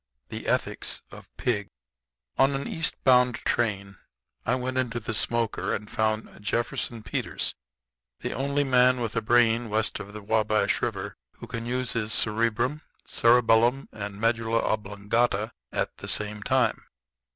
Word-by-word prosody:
THE -, -, -6 dB
ETHICS -, -, 0 dB
OF -, -, -12 dB
PIG 105 Hz, -5 st, -1 dB, 0.7 s
On 135 Hz, +1 st, +3 dB
an 135 Hz, -, -3 dB
east 160 Hz, -, -1 dB
bound 125 Hz, -1 st, +5 dB
train 100 Hz, -4 st, -1 dB, 0.5 s
I 125 Hz, -, +3 dB
went 130 Hz, 0 st, -2 dB
into 120 Hz, -2 st, -1 dB
the 110 Hz, 0 st, -4 dB
smoker 110 Hz, -3 st, 0 dB
and 105 Hz, +1 st, -7 dB
found 110 Hz, 0 st, 0 dB
Jefferson 115 Hz, +1 st, -2 dB
Peters, 100 Hz, -, -2 dB, 0.7 s
the -, -, -3 dB
only 140 Hz, +2 st, 0 dB
man 125 Hz, -1 st, +4 dB
with 115 Hz, -3 st, -3 dB
a 115 Hz, -, +1 dB
brain 115 Hz, 0 st, +3 dB
west 110 Hz, 0 st, 0 dB
of 100 Hz, -1 st, -8 dB
the 105 Hz, -1 st, -8 dB
Wabash 110 Hz, 0 st, +1 dB
River -, -, -3 dB, 0.2 s
who -, -, -10 dB
can 115 Hz, 0 st, -5 dB
use 125 Hz, 0 st, -1 dB
his 110 Hz, -2 st, -1 dB
cerebrum, 115 Hz, +6 st, +1 dB, 0.2 s
cerebellum, 120 Hz, +2 st, +4 dB
and 100 Hz, -2 st, -6 dB
medulla 115 Hz, 0 st, +1 dB
oblongata 105 Hz, +1 st, 0 dB, 0.2 s
at -, -, -1 dB
the -, -, -8 dB
same 105 Hz, 0 st, +1 dB
time. -, -, +1 dB
115 Hz, 145 wpm, -26 LUFS, 105-125 Hz, 0.7 s, bound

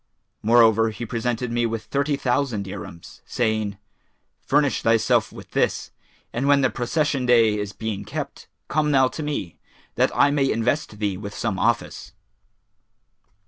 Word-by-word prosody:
Moreover, 115 Hz, 0 st, +5 dB
he 110 Hz, +2 st, -6 dB
presented 120 Hz, +1 st, -2 dB
me 120 Hz, 0 st, +1 dB
with 115 Hz, -1 st, -4 dB
thirty 140 Hz, +4 st, 0 dB
thousand 125 Hz, -5 st, 0 dB
dirhams, 85 Hz, -3 st, -9 dB
saying, 110 Hz, -3 st, -1 dB, 0.6 s
'Furnish 145 Hz, -1 st, +1 dB
thyself 115 Hz, -1 st, +2 dB
with -, -, -12 dB
this, -, -, 0 dB, 0.4 s
and 130 Hz, +4 st, -1 dB
when 140 Hz, -1 st, +5 dB
the 130 Hz, -, +2 dB
Procession 140 Hz, +1 st, -1 dB
day[FN#422] 115 Hz, -3 st, +4 dB
is 105 Hz, 0 st, -4 dB
being 110 Hz, -3 st, -4 dB
kept, 105 Hz, -, -6 dB, 0.2 s
come 150 Hz, 0 st, +1 dB
thou 135 Hz, -3 st, +4 dB
to 160 Hz, -, -7 dB
me, 145 Hz, -, -4 dB, 0.4 s
that -, -, +4 dB
I 145 Hz, -, +5 dB
may 140 Hz, -2 st, +2 dB
invest 120 Hz, 0 st, -1 dB
thee 100 Hz, -3 st, -1 dB
with 100 Hz, +1 st, -7 dB
some 100 Hz, -5 st, -2 dB
office.' -, -, -1 dB
115 Hz, 145 wpm, -23 LUFS, 110-135 Hz, 0.6 s, Moreover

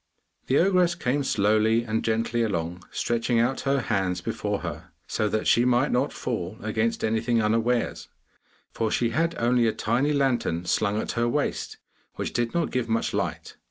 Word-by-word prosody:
The 135 Hz, -, +3 dB
ogress 180 Hz, -2 st, +3 dB
came 140 Hz, -2 st, 0 dB
slowly 110 Hz, 0 st, +2 dB
and 110 Hz, -1 st, -2 dB
gently 115 Hz, +1 st, 0 dB
along, 90 Hz, -4 st, -2 dB
stretching 120 Hz, 0 st, 0 dB
out 125 Hz, +3 st, +1 dB
her 140 Hz, -1 st, +2 dB
hands 95 Hz, -5 st, -1 dB
before -, -, -3 dB
her, -, -, -6 dB, 0.2 s
so 105 Hz, -, -1 dB
that 110 Hz, 0 st, -1 dB
she 120 Hz, -, +4 dB
might 125 Hz, +3 st, +2 dB
not 130 Hz, +4 st, +1 dB
fall 105 Hz, -4 st, -4 dB
against 110 Hz, +1 st, -1 dB
anything 115 Hz, +2 st, +1 dB
unawares, 115 Hz, +2 st, 0 dB, 0.6 s
for 115 Hz, -, -1 dB
she 115 Hz, +1 st, 0 dB
had 165 Hz, +6 st, 0 dB
only 120 Hz, 0 st, +2 dB
a 110 Hz, -, +1 dB
tiny 125 Hz, +7 st, 0 dB
lantern 125 Hz, -, 0 dB
slung 105 Hz, +4 st, +1 dB
at -, -, -3 dB
her 120 Hz, 0 st, 0 dB
waist, 145 Hz, +4 st, -2 dB, 0.4 s
which -, -, -4 dB
did 120 Hz, -1 st, 0 dB
not 170 Hz, -1 st, 0 dB
give 125 Hz, -2 st, -1 dB
much 115 Hz, 0 st, 0 dB
light. -, -, -3 dB
115 Hz, 170 wpm, -26 LUFS, 110-125 Hz, 0.6 s, she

